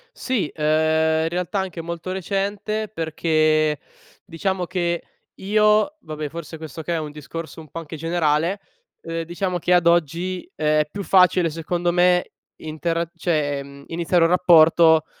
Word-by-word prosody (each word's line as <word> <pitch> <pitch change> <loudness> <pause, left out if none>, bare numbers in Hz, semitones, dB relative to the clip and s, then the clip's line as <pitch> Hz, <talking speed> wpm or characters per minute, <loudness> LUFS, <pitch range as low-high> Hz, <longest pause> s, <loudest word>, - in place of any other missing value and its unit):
Sì, 235 - -2
ehm, 160 +1 +2
in 165 - 0
realtà 180 +3 -2
anche 185 -3 -4
molto 170 +2 -6
recente 200 +3 -2
perché 155 -4 +1 0.5
diciamo 190 0 -2
che 175 -1 -2 0.3
io, 210 +7 +2
vabbè 155 -4 -6
forse 165 0 -8
questo 160 0 -8
che 170 +2 -3
è - - 0
un 150 -1 -5
discorso 155 +2 -8
un 155 - -15
po’ 165 - -6
anche 160 0 -8
generale, 165 +3 0 0.4
ehm, 165 0 -4
diciamo 175 +2 -3
che 180 +2 +1
ad 175 -1 +4
oggi 175 - 0
è 150 0 +1
più 200 - -5
facile 180 -2 +4
secondo 175 +2 -2
me 180 0 +3 0.3
intera 165 +2 -3
cioè, 150 -5 -1
mhmm, 140 0 -13
iniziare 170 +1 +1
un 165 - +4
rapporto, 165 -2 +5
165 Hz, 150 wpm, -22 LUFS, 155-180 Hz, 0.5 s, rapporto